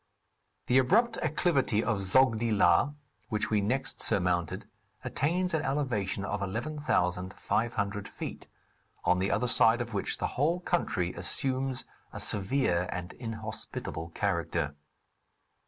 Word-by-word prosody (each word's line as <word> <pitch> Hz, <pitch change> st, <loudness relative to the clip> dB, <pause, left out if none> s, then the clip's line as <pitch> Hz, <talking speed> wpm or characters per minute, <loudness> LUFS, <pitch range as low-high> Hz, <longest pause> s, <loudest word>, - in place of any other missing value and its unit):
The 125 Hz, +1 st, +4 dB
abrupt 225 Hz, -, +3 dB
acclivity 140 Hz, -8 st, +1 dB
of 110 Hz, -4 st, 0 dB
Zodgi 115 Hz, +3 st, +3 dB
La, 100 Hz, +7 st, +4 dB, 0.4 s
which 105 Hz, 0 st, -1 dB
we 105 Hz, -1 st, +3 dB
next 125 Hz, +7 st, -1 dB
surmounted, 90 Hz, -3 st, +1 dB, 0.4 s
attains 175 Hz, +6 st, 0 dB
an 160 Hz, -, +1 dB
elevation 120 Hz, -10 st, -1 dB
of 105 Hz, 0 st, -3 dB
11,500 100 Hz, -3 st, -1 dB
feet, -, -, -7 dB, 0.6 s
on 90 Hz, 0 st, +3 dB
the 95 Hz, +1 st, 0 dB
other 125 Hz, -, +1 dB
side 115 Hz, -1 st, +6 dB
of 120 Hz, -2 st, -4 dB
which 100 Hz, -, -1 dB
the -, -, -2 dB, 0.2 s
whole 165 Hz, +4 st, +2 dB
country 95 Hz, -, -1 dB
assumes 130 Hz, +8 st, 0 dB, 0.3 s
a -, -, -7 dB
severe 95 Hz, -4 st, +1 dB
and 90 Hz, +1 st, -5 dB
inhospitable 110 Hz, -7 st, -5 dB
character. 85 Hz, -6 st, -1 dB
110 Hz, 120 wpm, -29 LUFS, 95-135 Hz, 0.6 s, side